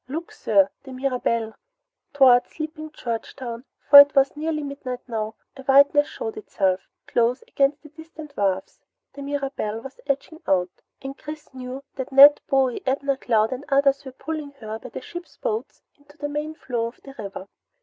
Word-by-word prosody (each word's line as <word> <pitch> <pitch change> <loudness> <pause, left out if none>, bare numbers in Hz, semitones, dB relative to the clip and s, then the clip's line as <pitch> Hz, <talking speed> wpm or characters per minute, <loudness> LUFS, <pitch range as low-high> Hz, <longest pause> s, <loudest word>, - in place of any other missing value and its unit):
"Look 320 +6 -5
sir 285 -1 +2
the 265 - -11
Mirabelle!" 250 -4 -1 0.6
Toward 255 -3 +5
sleeping 310 0 -7
Georgetown, 235 -1 -6 0.2
for 285 - +12
it 285 0 +8
was 275 +1 +4
nearly 305 0 -2
midnight 275 -3 -6
now, 220 -2 -3 0.2
a 270 - -10
whiteness 280 +2 +5
showed 445 -3 -6
itself, 195 - 0 0.2
close 240 +2 +1
against 280 +2 0
the 300 - -13
distant 315 -1 -12
wharfs. 190 -3 -1 0.3
The 280 - -9
Mirabelle 275 -6 -3
was 265 +3 -11
edging 280 +3 -3
out, 180 -2 +2 0.3
and 270 0 -6
Chris 300 -1 -10
knew 260 +1 -7
that 260 0 -5
Ned, 280 +2 +9
Bowie, 265 -3 +2
Abner 275 +1 +1
Cloud, 225 -4 +1
and 260 +2 -4
others 275 0 +3
were 265 - -8
pulling 290 +2 -6
her 220 -5 -7
by 255 - -10
the - - -7
ship's 345 +6 -10
boats 450 -3 -4
into 290 +1 -22
the 290 -1 -4
main 300 +2 -4
flow 240 -6 -3
of 235 - -11
the 275 - -11
river. 195 -2 -7
275 Hz, 170 wpm, -24 LUFS, 245-290 Hz, 0.6 s, for